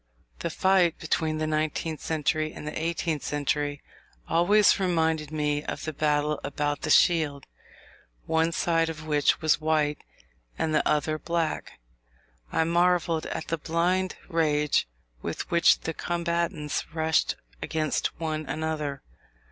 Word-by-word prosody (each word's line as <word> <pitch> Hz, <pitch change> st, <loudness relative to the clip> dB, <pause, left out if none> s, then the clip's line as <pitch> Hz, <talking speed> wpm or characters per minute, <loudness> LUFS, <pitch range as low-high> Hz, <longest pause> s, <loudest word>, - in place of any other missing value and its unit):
The -, -, -2 dB
fight 185 Hz, -3 st, +3 dB
between 155 Hz, -2 st, -1 dB
the 155 Hz, -, -1 dB
nineteenth 155 Hz, +1 st, -1 dB
century 155 Hz, 0 st, 0 dB
and -, -, -9 dB
the -, -, -5 dB
eighteenth 165 Hz, -2 st, -2 dB, 1.0 s
always 200 Hz, +5 st, +4 dB
reminded 160 Hz, -5 st, +1 dB
me 150 Hz, -1 st, 0 dB
of -, -, -4 dB
the 155 Hz, -, -3 dB
battle 150 Hz, 0 st, +1 dB
about 145 Hz, +1 st, -2 dB
the -, -, -3 dB
shield, 155 Hz, -6 st, +3 dB, 0.8 s
one 160 Hz, +1 st, +2 dB
side 165 Hz, -1 st, +1 dB
of 160 Hz, -1 st, -7 dB
which 150 Hz, 0 st, +2 dB
was 155 Hz, -1 st, +2 dB
white 155 Hz, -1 st, +1 dB, 0.6 s
and 155 Hz, -, -1 dB
the 155 Hz, -, +4 dB
other 155 Hz, +1 st, +1 dB
black. 170 Hz, -1 st, -2 dB, 0.8 s
I -, -, +2 dB
marvelled 170 Hz, -1 st, +2 dB
at -, -, -5 dB
the 165 Hz, -, -1 dB
blind 180 Hz, +4 st, 0 dB
rage 150 Hz, -, +1 dB, 0.3 s
with -, -, -5 dB
which 170 Hz, 0 st, +5 dB
the 165 Hz, -, -3 dB
combatants 170 Hz, -3 st, -2 dB
rushed 160 Hz, 0 st, +2 dB, 0.3 s
against 155 Hz, -1 st, -1 dB
one 155 Hz, -2 st, -3 dB
another. 150 Hz, -1 st, -3 dB
160 Hz, 130 wpm, -27 LUFS, 150-170 Hz, 1.0 s, which